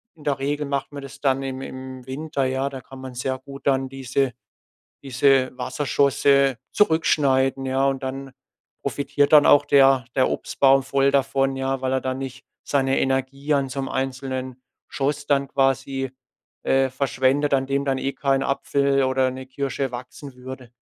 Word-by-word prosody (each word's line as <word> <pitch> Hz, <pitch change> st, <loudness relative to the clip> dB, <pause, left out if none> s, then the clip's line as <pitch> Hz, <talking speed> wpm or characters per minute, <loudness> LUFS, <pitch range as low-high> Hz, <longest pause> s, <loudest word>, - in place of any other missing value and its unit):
in 155 Hz, -, -17 dB
der 140 Hz, -2 st, -1 dB
Regel 145 Hz, +2 st, -1 dB
macht 140 Hz, 0 st, -2 dB
man 140 Hz, -1 st, -8 dB
das 140 Hz, -, -10 dB
dann 135 Hz, -1 st, +1 dB
im 130 Hz, -1 st, -5 dB
im 130 Hz, -1 st, -8 dB
Winter, 140 Hz, +1 st, -2 dB
ja. 130 Hz, +1 st, -1 dB
Da 135 Hz, -2 st, -8 dB
kann 135 Hz, +2 st, -13 dB
man 130 Hz, -1 st, -8 dB
sehr 130 Hz, +1 st, -2 dB
gut 140 Hz, +1 st, -12 dB
dann 135 Hz, -1 st, +1 dB
diese 135 Hz, 0 st, -1 dB, 0.7 s
diese 135 Hz, 0 st, +3 dB
Wasserschosse 140 Hz, 0 st, +2 dB
zurückschneiden, 135 Hz, -7 st, +2 dB
ja. 135 Hz, +1 st, +1 dB
Und 135 Hz, 0 st, -1 dB
dann 135 Hz, 0 st, -5 dB, 0.5 s
profitiert 145 Hz, 0 st, 0 dB
dann 150 Hz, -1 st, +8 dB
auch 145 Hz, 0 st, +6 dB
der 135 Hz, -3 st, +5 dB
der 130 Hz, -, +3 dB
Obstbaum 135 Hz, 0 st, +2 dB
voll 135 Hz, +1 st, +2 dB
davon, 135 Hz, 0 st, +1 dB
ja, 135 Hz, 0 st, -2 dB
weil 130 Hz, 0 st, -1 dB
er 130 Hz, -, 0 dB
dann 130 Hz, 0 st, -3 dB
nicht 135 Hz, 0 st, -7 dB, 0.2 s
seine 135 Hz, -1 st, +1 dB
Energie 135 Hz, +2 st, -1 dB
an 140 Hz, -2 st, +1 dB
so 135 Hz, +2 st, -5 dB
'nem 135 Hz, -, -4 dB
einzelnen 130 Hz, -1 st, -4 dB, 0.3 s
Schoss 145 Hz, +1 st, -2 dB
dann 140 Hz, -1 st, +2 dB
quasi, 135 Hz, -1 st, 0 dB, 0.5 s
äh, 135 Hz, 0 st, +2 dB
verschwendet, 135 Hz, +2 st, +1 dB
an 135 Hz, -1 st, +1 dB
dem 140 Hz, +1 st, -1 dB
dann 135 Hz, -1 st, 0 dB
eh 135 Hz, +1 st, -2 dB
kein 135 Hz, -1 st, +1 dB
Apfel 140 Hz, 0 st, +1 dB
oder 130 Hz, 0 st, +2 dB
'ne 130 Hz, 0 st, -8 dB
Kirsche 135 Hz, 0 st, -3 dB
wachsen 125 Hz, +3 st, -9 dB
würde. 125 Hz, -1 st, -10 dB
135 Hz, 170 wpm, -23 LUFS, 130-140 Hz, 0.7 s, dann